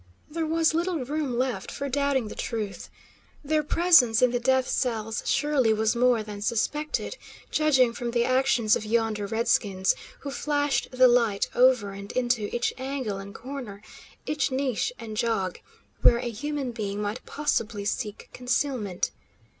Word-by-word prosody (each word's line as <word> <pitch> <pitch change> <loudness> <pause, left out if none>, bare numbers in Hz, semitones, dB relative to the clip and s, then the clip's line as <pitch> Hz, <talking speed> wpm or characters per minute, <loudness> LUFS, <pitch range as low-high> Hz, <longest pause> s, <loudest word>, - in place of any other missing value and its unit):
There 325 0 -2
was 325 0 +2
little 335 -4 -1
room 285 -3 -2
left 245 -6 -1
for 280 - -4
doubting 275 -3 0
the - - -7
truth. 215 -4 -4 0.6
Their 310 +1 +2
presence 295 -8 +4
in 250 - +5
the 245 - 0
death 260 +1 +2
cells 225 -3 -1
surely 275 -6 +2
was 220 +1 +1
more 240 -2 +3
than 205 -1 -8
suspected, 295 - -1 0.3
judging 265 -6 +3
from 240 0 -4
the 235 0 +1
actions 255 -4 +3
of - - -3
yonder 220 -2 0
redskins, 200 -3 +1 0.3
who 280 - -5
flashed 290 0 0
the 255 0 +5
light 230 -5 +2
over 250 -5 +4
and 200 +1 -8
into 240 -4 0
each 240 0 0
angle 260 -7 -3
and 200 +2 -9
corner, 245 -6 -7 0.4
each 300 -1 0
niche 265 - -1
and 215 -1 -7
jog, 210 -6 -1 0.4
where 235 - +6
a 240 0 -3
human 280 +2 -3
being 205 -3 -4
might 210 +3 -3
possibly 230 -8 -1
seek 210 0 -3
concealment. 250 -6 -1
245 Hz, 155 wpm, -26 LUFS, 215-280 Hz, 0.6 s, where